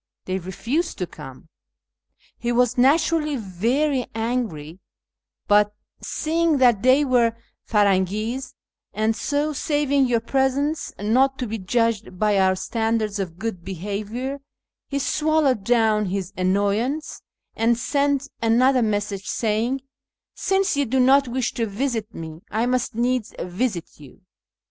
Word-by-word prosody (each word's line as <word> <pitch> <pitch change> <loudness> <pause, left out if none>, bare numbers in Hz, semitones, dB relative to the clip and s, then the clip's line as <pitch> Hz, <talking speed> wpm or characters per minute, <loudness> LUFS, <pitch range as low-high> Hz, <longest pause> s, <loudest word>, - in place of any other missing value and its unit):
They 185 +1 -2
refused 235 - -2
to 180 - -2
come. 150 -3 -12 0.9
He 240 - -1
was 245 0 +2
naturally 300 +3 +3
very 245 - 0
angry; 220 -9 -3 0.7
but, 210 0 +4 0.3
seeing 325 0 0
that 240 -6 +4
they 260 +4 +4
were 235 -3 +2 0.3
Firangis, 210 +5 +1 0.4
and 220 +1 +1
so 295 +5 -1
(saving 285 -2 +1
your 235 -2 +2
presence) 270 +5 0
not 260 +6 +2
to 255 - -3
be 225 0 -4
judged 220 -1 0
by 210 0 +2
our 190 0 +3
standards 220 +1 -1
of 175 -4 -4
good 205 -4 -4
behaviour, 210 - -4 0.5
he 280 - -2
swallowed 300 -5 +1
down 220 -2 +2
his 190 0 -3
annoyance, 205 +10 0 0.3
and 230 +1 +2
sent 280 +2 0
another 250 +3 +4
message 205 -3 -1
saying, 230 +4 0 0.3
' - - -69
Since 385 -3 +1
you 285 0 +1
do 260 +3 +1
not 270 +2 +5
wish 245 0 -1
to 230 -1 -1
visit 225 0 -2
me, 160 -4 -8
I 220 +3 0
must 250 -1 -1
needs 245 -1 -1
visit 180 0 -2
you.' 140 -4 -15
230 Hz, 130 wpm, -23 LUFS, 205-265 Hz, 0.9 s, not